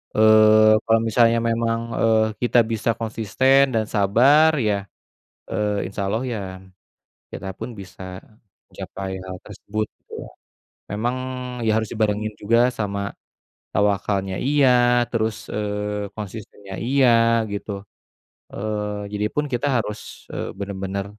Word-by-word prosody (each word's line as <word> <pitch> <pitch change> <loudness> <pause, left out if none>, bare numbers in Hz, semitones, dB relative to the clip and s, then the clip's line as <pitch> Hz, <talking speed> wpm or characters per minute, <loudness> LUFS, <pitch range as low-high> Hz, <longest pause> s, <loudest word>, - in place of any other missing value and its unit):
Eee, 110 0 +6
kalau 115 0 +4
misalnya 115 +1 +4
memang, 115 0 0 0.2
eee, 110 -1 +4 0.2
kita 120 0 +3
bisa 110 +1 -1
konsisten 115 +5 +2
dan 110 -1 +1
sabar 130 +11 +5
ya, 105 -5 0 0.6
eee, 105 -2 -1
Insya 100 +1 -5
Allah 115 +4 -1
ya, 120 -4 -3 0.9
kita 95 - -7
pun 115 - -6
bisa 95 -1 -9 0.5
mencapai 95 -1 -6
hal 95 0 -7
tersebut 105 +1 -4
gitu - - -19
ya. - - -11 0.7
Memang, 120 +4 -1 0.5
ya - - +4
harus 110 -1 -1
dibarengin 110 -1 0
juga 115 +4 +3
sama 100 -3 -3 0.6
tawakalnya, 100 -2 0
iya, 140 -1 +3 0.4
terus, 110 -2 -2
eee, 105 -1 -3
konsistennya 105 -2 -8
iya, 130 +2 +3 0.4
gitu. 100 +1 -5 0.8
Eee, 105 0 -3
jadi 105 0 -1
pun 150 - 0
kita 120 +4 0
harus, 105 -2 -6
eee, - - -4
benar-benar 100 0 -4
110 Hz, 120 wpm, -22 LUFS, 100-115 Hz, 0.9 s, Eee